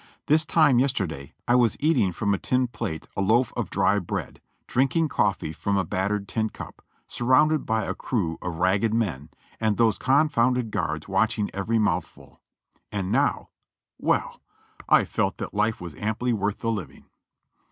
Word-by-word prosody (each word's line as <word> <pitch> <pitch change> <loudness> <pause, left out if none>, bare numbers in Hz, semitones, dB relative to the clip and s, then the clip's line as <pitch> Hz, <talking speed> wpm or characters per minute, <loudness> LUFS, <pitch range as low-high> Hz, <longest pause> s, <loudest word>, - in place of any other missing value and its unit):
This 155 +1 +3
time 145 -6 +4
yesterday 95 - -2
I 120 - +3
was 120 -4 +3
eating 150 - +2
from 100 +4 -1
a 95 - -1
tin 130 0 +1
plate 80 -9 -5
a - - -1
loaf 115 +5 +2
of - - -3
dry 105 - +2
bread, 90 - -5 0.2
drinking 140 +5 +1
coffee 100 - 0
from 100 +5 -1
a 95 - +1
battered 100 +4 -1
tin 110 +2 -1
cup, - - -10 0.3
surrounded 145 +5 +2
by 110 0 +1
a - - -2
crew 90 -10 -2
of 90 -2 -4
ragged 95 +6 +1
men, 85 - -2 0.3
and 110 -2 +1
those 110 -5 +2
confounded 125 -4 +2
guards 80 -6 -2
watching 105 +2 0
every 110 +4 -1
mouthful: 90 -6 -2 0.5
and 100 -2 -3
now - - +1 0.2
— - - -65
\Ye\\\ - - +3 0.7
I - - +5
felt - - -1
that - - -6
life 105 +2 0
was 85 -3 -7
amply 110 +7 -1
worth 105 0 -2
the 115 - 0
living. 105 -6 -6
110 Hz, 165 wpm, -25 LUFS, 95-125 Hz, 0.7 s, I